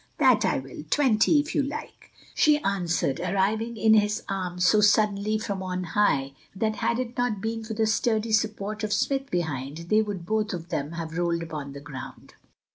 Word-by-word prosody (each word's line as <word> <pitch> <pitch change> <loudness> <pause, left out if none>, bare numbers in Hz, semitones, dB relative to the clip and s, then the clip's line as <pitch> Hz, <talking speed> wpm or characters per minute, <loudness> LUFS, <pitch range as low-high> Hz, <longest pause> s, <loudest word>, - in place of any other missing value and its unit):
"That 255 -7 +4
I 185 - +1
will, 135 +1 -7
twenty, 260 - +4
if 300 - -6
you 295 - +2
like," 285 +2 -7 0.2
she 300 -1 +4
answered, 175 -8 0
arriving 200 +6 0
in 220 0 +4
his 210 -1 +2
arms 180 -2 -2
so 210 +3 +5
suddenly 210 0 +3
from 205 -3 -4
on 185 -1 -3
high, 160 -7 +1 0.2
that 215 +2 -1
had 235 - 0
it 245 -1 -4
not 245 -4 0
been 225 +2 -3
for 220 0 -5
the 220 0 +2
sturdy 220 +1 +1
support 215 -1 -1
of 210 -1 0
Smith 270 +4 0
behind, 145 -5 -3
they 215 +1 +5
would 200 -5 -4
both 215 +1 -1
of 170 -1 -6
them 155 -2 -3
have 165 0 -5
rolled 170 -1 0
upon 150 -4 -6
the 140 - -9
ground. 140 -2 -10
210 Hz, 190 wpm, -26 LUFS, 175-220 Hz, 0.2 s, so